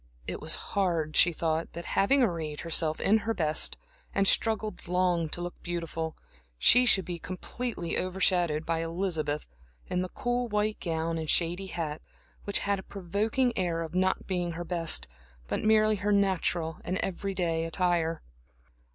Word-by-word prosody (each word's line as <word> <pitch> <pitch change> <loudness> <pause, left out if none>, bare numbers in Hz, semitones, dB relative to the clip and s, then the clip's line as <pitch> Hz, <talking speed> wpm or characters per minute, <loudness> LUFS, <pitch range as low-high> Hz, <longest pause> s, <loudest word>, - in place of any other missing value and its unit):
It - - -5
was - - +1 0.2
hard, 165 -6 0
she 175 - +6
thought, 160 0 -2
that, 170 +1 -7
having 265 +7 +4
arrayed 160 -8 -2
herself 160 -1 +2
in 215 +3 +4
her 225 +1 -2
best, 155 -4 +2 0.4
and 195 0 +3
struggled 220 -2 +2
long 175 -2 +1
to 175 - -4
look 175 0 -6
beautiful, 165 -2 -4 0.4
she 245 - +6
should 190 -5 +4
be 175 -1 -5
completely 185 0 -4
over 185 +1 -4
shadowed 170 -5 +2
by 165 -1 0
Elizabeth 165 -3 -2 0.4
in 180 - +1
the 185 - -3
cool 245 +3 -1
white 210 0 -1
gown 165 -1 -2
and 160 -1 -4
shady 175 +3 +2
hat, 160 -4 -4 0.4
which 200 - +1
had 200 -1 0
a - - -8
provoking 210 +7 -1
air 170 -3 -1
of 165 0 -8
not 185 +1 +1
being 175 -2 -2
her 175 +1 -5
best, 165 -1 0 0.4
but - - -2
merely 215 0 +4
her 205 +2 -1
natural 180 -5 +1
and 185 - -2
everyday 180 -3 -1
attire. 165 -1 0
175 Hz, 160 wpm, -29 LUFS, 165-200 Hz, 0.4 s, she